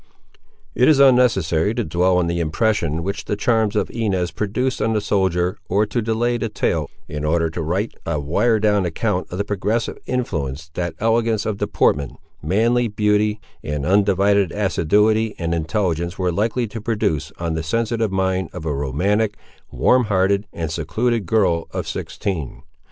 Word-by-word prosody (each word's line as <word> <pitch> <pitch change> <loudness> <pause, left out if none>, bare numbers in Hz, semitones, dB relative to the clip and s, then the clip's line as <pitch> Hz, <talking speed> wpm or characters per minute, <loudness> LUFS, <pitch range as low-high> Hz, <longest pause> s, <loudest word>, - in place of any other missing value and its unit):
It 125 - +3
is 150 -3 +5
unnecessary 110 - +4
to - - 0
dwell 90 +3 +2
on 90 - +2
the 85 0 -1
impression 85 -1 0
which 100 +3 -4
the - - -1
charms 110 0 +1
of 105 - 0
Inez 95 -6 -1
produced 125 +5 -2
on 110 - +1
the 110 - +2
soldier, 95 -3 0
or 100 +4 +2
to 115 +3 -2
delay 115 +2 0
the 115 - -2
tale 80 -8 -1 0.2
in 75 0 -5
order 80 +1 +1
to 85 - -4
write 95 +8 -1
a 80 -3 -2
wire 105 +11 +1
drawn 105 -2 +2
account 85 -3 -1
of 90 - -4
the 100 - 0
progressive 105 +3 -2
influence 80 - -3
that 85 -1 -3
elegance 115 -1 +1
of 105 -3 -2
deportment, 70 -3 +1 0.3
manly 115 +8 +2
beauty, 105 0 +1 0.2
and 75 -1 -3
undivided 100 0 +3
assiduity 105 +3 +2
and 85 -1 -2
intelligence 85 +1 -1
were 90 -1 0
likely 110 +7 0
to 110 +1 -7
produce 80 -10 -1
on 85 -1 -2
the 80 - -2
sensitive 115 +5 -1
mind 95 -1 0
of 90 -3 -7
a 75 - -1
romantic, 95 +11 0 0.3
warm 125 -1 +3
hearted, 100 0 +1
and 80 -2 -4
secluded 115 +3 -1
girl 90 -6 +2
of - - -4
sixteen. 75 -8 -4
100 Hz, 165 wpm, -21 LUFS, 85-110 Hz, 0.3 s, is